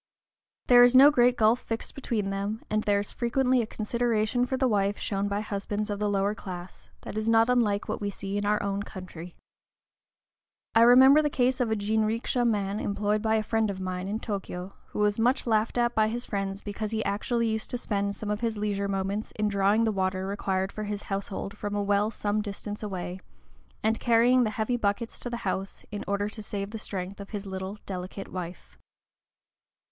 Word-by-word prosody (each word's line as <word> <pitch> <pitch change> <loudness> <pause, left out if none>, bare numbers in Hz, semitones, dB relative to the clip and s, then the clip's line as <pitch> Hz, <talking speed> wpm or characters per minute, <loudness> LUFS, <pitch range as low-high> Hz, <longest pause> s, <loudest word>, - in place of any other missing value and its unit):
There 245 -1 +7
is 245 +1 +5
no 275 +3 +9
great 245 -2 +4
gulf 220 +2 +4
fixed 225 -2 -5
between 215 -7 -2
them, 200 +3 -3
and 215 0 +2
there 205 -1 +2
is 205 - -6
frequently 250 +1 +1
a 225 - -3
consideration 235 +2 0
for 260 - -1
the 260 0 +2
wife 205 -2 +1
shown 200 0 -2
by 200 +1 -1
husbands 210 0 -3
of 205 - -3
the 210 0 0
lower 200 0 +1
class, 185 -4 -9
that 215 - -4
is 215 +1 -1
not 225 +1 +5
unlike 210 -5 +1
what - - -3
we 205 - -1
see 195 0 -5
in 205 - -1
our 210 +1 +1
own 200 0 -1
country. 180 -4 -9 1.4
I 225 - +5
remember 260 +5 +8
the 300 - +1
case 255 -1 +1
of 245 -3 +1
a 220 - +1
jinrikisha 220 +3 0
man 205 -2 0
employed 205 +1 0
by 220 0 +2
a 215 - +1
friend 220 0 +1
of 195 -1 -4
mine 185 0 -3
in 210 +2 -2
Tōkyō, 195 -4 -5 0.2
who - - -9
was 210 +1 +2
much 250 +4 +2
laughed 220 0 +1
at 240 0 +2
by 215 0 +3
his 240 +2 -3
friends 195 -1 -3
because 210 +1 -4
he 220 0 -2
actually 230 +3 0
used 220 0 -2
to 245 - -2
spend 200 -3 -2
some 210 -1 -4
of 210 - -1
his 225 -2 -1
leisure 205 -1 -1
moments 195 +2 -2
in 210 0 0
drawing 200 +2 +3
the 225 - +2
water 190 -1 -1
required 195 -1 -1
for 215 - -5
his 205 0 -4
household 195 0 -4
from 205 -1 -4
a 205 - 0
well 205 +1 +2
some 210 -1 -1
distance 205 0 -6
away, 185 -3 -4 0.6
and 220 +1 +1
carrying 240 +2 +4
the - - 0
heavy 220 +3 -1
buckets 225 +1 -1
to 245 - -5
the 235 - -3
house, 195 0 -3
in 205 - -4
order 200 0 0
to 215 +1 -7
save 200 -1 -4
the 225 - -5
strength 195 -1 -5
of 200 - -8
his 205 -2 -5
little, 190 +1 -5
delicate 185 +1 -6
wife. 180 -1 -8
210 Hz, 205 wpm, -27 LUFS, 200-225 Hz, 1.4 s, no